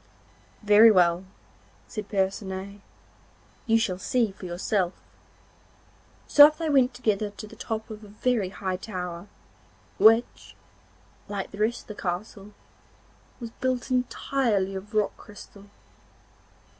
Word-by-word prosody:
'Very 210 Hz, +2 st, +7 dB
well,' 180 Hz, -2 st, +3 dB, 0.6 s
said 215 Hz, -2 st, -7 dB
Percinet, 195 Hz, 0 st, -3 dB, 0.9 s
'you 225 Hz, 0 st, +4 dB
shall 190 Hz, -5 st, -1 dB
see 230 Hz, +1 st, 0 dB
for 190 Hz, -1 st, -10 dB
yourself.' 180 Hz, +1 st, -2 dB, 1.3 s
So 290 Hz, 0 st, +9 dB
up 305 Hz, -, -5 dB
they 325 Hz, -2 st, -2 dB
went 260 Hz, -3 st, +3 dB
together 215 Hz, -4 st, -1 dB
to 205 Hz, +1 st, -10 dB
the 210 Hz, -, -13 dB
top 220 Hz, -1 st, -5 dB
of 215 Hz, 0 st, -9 dB
a -, -, -12 dB
very 215 Hz, -1 st, -1 dB
high 190 Hz, -1 st, -4 dB
tower, 180 Hz, -2 st, -6 dB, 0.7 s
which, 225 Hz, +2 st, +3 dB, 0.7 s
like 200 Hz, -2 st, -5 dB
the 200 Hz, -, -10 dB
rest 225 Hz, +3 st, 0 dB
of -, -, -23 dB
the -, -, -11 dB
castle, 195 Hz, +3 st, -5 dB, 0.9 s
was 230 Hz, -2 st, -7 dB
built 255 Hz, 0 st, -1 dB
entirely 250 Hz, -5 st, 0 dB
of 200 Hz, +3 st, -8 dB
rock 210 Hz, -1 st, +1 dB
crystal. 205 Hz, -1 st, -14 dB
210 Hz, 125 wpm, -26 LUFS, 190-230 Hz, 1.3 s, So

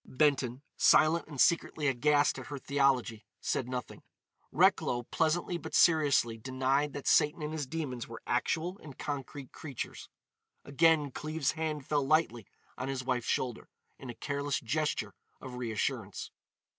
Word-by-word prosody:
Benton, 135 Hz, -2 st, +1 dB
silent 155 Hz, +2 st, +4 dB
and 145 Hz, -4 st, -9 dB
secretly 160 Hz, -2 st, +2 dB
aghast 145 Hz, +3 st, +2 dB
at -, -, -9 dB
her 145 Hz, -, -5 dB
theology, 135 Hz, -5 st, +1 dB, 0.2 s
said 125 Hz, -, -1 dB
nothing. 125 Hz, -1 st, -5 dB, 0.5 s
Recklow 120 Hz, 0 st, +3 dB
pleasantly 170 Hz, +5 st, 0 dB
but 160 Hz, +1 st, -6 dB
seriously 145 Hz, -8 st, +4 dB
denied 135 Hz, +4 st, 0 dB
that 145 Hz, -, -6 dB
Satan 150 Hz, +1 st, +3 dB
and 150 Hz, +1 st, -3 dB
his 150 Hz, -4 st, -3 dB
demons 135 Hz, -6 st, -4 dB
were 115 Hz, 0 st, -10 dB
actual 165 Hz, +9 st, -1 dB
and 145 Hz, -4 st, -12 dB
concrete 140 Hz, -1 st, -6 dB
creatures. 140 Hz, -7 st, -7 dB, 0.6 s
Again 150 Hz, 0 st, +3 dB
Cleves's 155 Hz, +1 st, -2 dB
hand 155 Hz, -3 st, -3 dB
fell 145 Hz, -2 st, +1 dB
lightly 135 Hz, -7 st, +1 dB, 0.3 s
on 130 Hz, -, -3 dB
his 135 Hz, -1 st, -3 dB
wife's 125 Hz, -2 st, -1 dB
shoulder, 125 Hz, -3 st, -2 dB, 0.3 s
in 130 Hz, -, -9 dB
a 120 Hz, -, -6 dB
careless 145 Hz, +2 st, -2 dB
gesture 150 Hz, +6 st, -1 dB, 0.3 s
of 130 Hz, -, -9 dB
reassurance. 115 Hz, -4 st, -3 dB
140 Hz, 145 wpm, -31 LUFS, 125-155 Hz, 0.6 s, silent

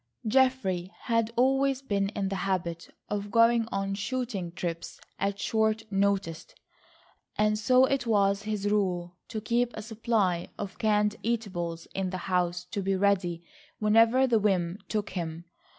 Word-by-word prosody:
Geoffrey 215 Hz, -8 st, +2 dB
had 230 Hz, -1 st, 0 dB
always 270 Hz, +2 st, +2 dB
been 200 Hz, -5 st, 0 dB
in 195 Hz, -2 st, -1 dB
the 195 Hz, -, -2 dB
habit 180 Hz, -3 st, -2 dB, 0.2 s
of 205 Hz, 0 st, -3 dB
going 230 Hz, +1 st, +4 dB
on 195 Hz, 0 st, -1 dB
shooting 205 Hz, -4 st, -3 dB
trips 170 Hz, -1 st, -5 dB, 0.2 s
at 200 Hz, 0 st, -1 dB
short 220 Hz, +1 st, +1 dB
notice, 195 Hz, -4 st, 0 dB, 0.9 s
and 210 Hz, 0 st, +2 dB
so 255 Hz, +4 st, +5 dB
it 265 Hz, -2 st, -1 dB
was 200 Hz, -2 st, +3 dB
his 210 Hz, -1 st, -2 dB
rule 180 Hz, -4 st, 0 dB
to 220 Hz, -, -4 dB
keep 235 Hz, +2 st, +1 dB
a 215 Hz, -, -6 dB
supply 215 Hz, -5 st, 0 dB
of 195 Hz, -2 st, -6 dB
canned 210 Hz, -1 st, +2 dB
eatables 185 Hz, -8 st, -3 dB
in 190 Hz, -1 st, -1 dB
the 185 Hz, -, -3 dB, 0.2 s
house 180 Hz, 0 st, 0 dB
to 190 Hz, +3 st, -4 dB
be 195 Hz, 0 st, 0 dB
ready 185 Hz, -3 st, +1 dB, 0.3 s
whenever 225 Hz, +4 st, +4 dB
the 235 Hz, -4 st, +3 dB
whim 190 Hz, -3 st, 0 dB
took 210 Hz, -1 st, -2 dB
him. 170 Hz, -2 st, -5 dB
205 Hz, 150 wpm, -28 LUFS, 185-225 Hz, 0.9 s, so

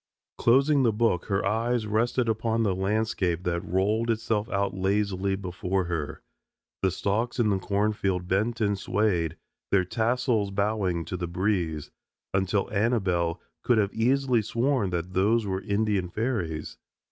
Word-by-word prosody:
Closing 135 Hz, +4 st, +4 dB
the 120 Hz, -3 st, +3 dB
book, 105 Hz, -5 st, +1 dB
her 95 Hz, -2 st, 0 dB
eyes 115 Hz, +3 st, 0 dB
rested 115 Hz, +3 st, +1 dB
upon 115 Hz, +1 st, 0 dB
the 100 Hz, -3 st, +2 dB
landscape 95 Hz, -3 st, 0 dB
that 85 Hz, -1 st, -1 dB
rolled 105 Hz, +6 st, 0 dB
itself 110 Hz, -1 st, 0 dB
out 100 Hz, 0 st, 0 dB
lazily 95 Hz, 0 st, 0 dB
before 95 Hz, 0 st, -2 dB
her. 85 Hz, -4 st, -4 dB, 0.6 s
The 95 Hz, -, +3 dB
stalks 110 Hz, +7 st, -1 dB
in 115 Hz, -4 st, +2 dB
the 95 Hz, -, +1 dB
cornfield 100 Hz, -2 st, 0 dB
bent 110 Hz, +6 st, 0 dB
and 100 Hz, -2 st, +1 dB
swayed, 90 Hz, -6 st, 0 dB, 0.3 s
their 95 Hz, -2 st, +3 dB
tassels 115 Hz, +1 st, 0 dB
bowing 100 Hz, -4 st, 0 dB
to 90 Hz, +3 st, -4 dB
the 85 Hz, -1 st, -3 dB
breeze, 85 Hz, -4 st, -1 dB, 0.4 s
until 95 Hz, +1 st, +1 dB
Annabelle 95 Hz, -6 st, +1 dB, 0.2 s
could 120 Hz, -, +2 dB
have 100 Hz, -2 st, +1 dB
easily 125 Hz, +1 st, +2 dB
sworn 115 Hz, 0 st, 0 dB
that 90 Hz, +1 st, -3 dB
those 105 Hz, +5 st, +2 dB
were 95 Hz, -1 st, -2 dB
Indian 100 Hz, -3 st, 0 dB
fairies. 95 Hz, -, -3 dB
100 Hz, 145 wpm, -27 LUFS, 95-115 Hz, 0.6 s, Closing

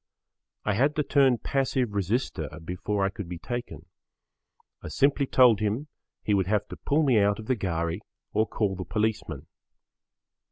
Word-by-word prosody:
I 105 Hz, -, +2 dB
had 140 Hz, +8 st, +2 dB
to 150 Hz, -, +1 dB
turn 135 Hz, -3 st, +4 dB
passive 130 Hz, -3 st, 0 dB
resister 100 Hz, -, -1 dB, 0.2 s
before 95 Hz, +3 st, -1 dB
I -, -, +1 dB
could 100 Hz, -3 st, -7 dB
be 90 Hz, -, -5 dB
taken. 85 Hz, -, -6 dB, 1.0 s
I -, -, -8 dB
simply 140 Hz, 0 st, +2 dB
told 125 Hz, -5 st, +5 dB
him 110 Hz, +8 st, -1 dB, 0.3 s
he 105 Hz, -, +1 dB
would 95 Hz, -3 st, +2 dB
have 105 Hz, 0 st, +1 dB
to -, -, -6 dB
pull 150 Hz, +3 st, +1 dB
me 130 Hz, -7 st, +4 dB
out 100 Hz, 0 st, +3 dB
of 110 Hz, -, -8 dB
the 130 Hz, -, +1 dB
ghari 85 Hz, -4 st, -2 dB, 0.3 s
or 110 Hz, +1 st, +2 dB
call 100 Hz, -3 st, -1 dB
the 95 Hz, -, -4 dB
policeman. 105 Hz, +4 st, -2 dB
105 Hz, 165 wpm, -27 LUFS, 95-130 Hz, 1.0 s, told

